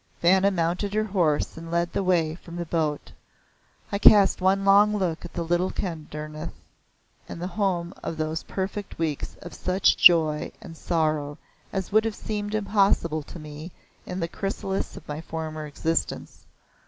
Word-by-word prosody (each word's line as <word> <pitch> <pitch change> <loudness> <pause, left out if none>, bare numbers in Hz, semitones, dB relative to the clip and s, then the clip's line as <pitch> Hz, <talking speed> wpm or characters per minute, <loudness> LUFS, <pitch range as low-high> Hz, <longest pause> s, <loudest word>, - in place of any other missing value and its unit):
Vanna 190 +3 +5
mounted 185 +3 -1
her 215 - +2
horse 175 -10 0
and 165 0 -8
led 170 0 0
the - - 0
way 170 -4 +2
from 170 0 -11
the 175 0 -3
boat. 155 -3 -2 0.8
I 200 - -1
cast 200 -3 +6
one 195 +1 +2
long 205 +2 +5
look 175 -4 -1
at 175 - -9
the 170 - -2
little 175 +2 +1
Kedarnath, 155 -3 -5 0.7
the 170 - -6
home 185 -3 -1
of 160 - -4
those 155 0 -2
perfect 195 +1 -5
weeks, 160 -3 -3
of 175 - -9
such 185 +1 +2
joy 155 -3 +5
and 165 - -10
sorrow 155 -3 -1 0.3
as 190 -1 -3
would 215 +2 +4
have 225 -2 -2
seemed 210 -1 -4
impossible 195 -6 +2
to 150 - -11
me 155 +2 -9 0.4
in 180 +1 -4
the 165 - -1
chrysalis 195 +2 -3
of - - -12
my 150 +1 -5
former 155 -1 -5
existence. 160 +3 -3
170 Hz, 160 wpm, -25 LUFS, 160-195 Hz, 0.8 s, cast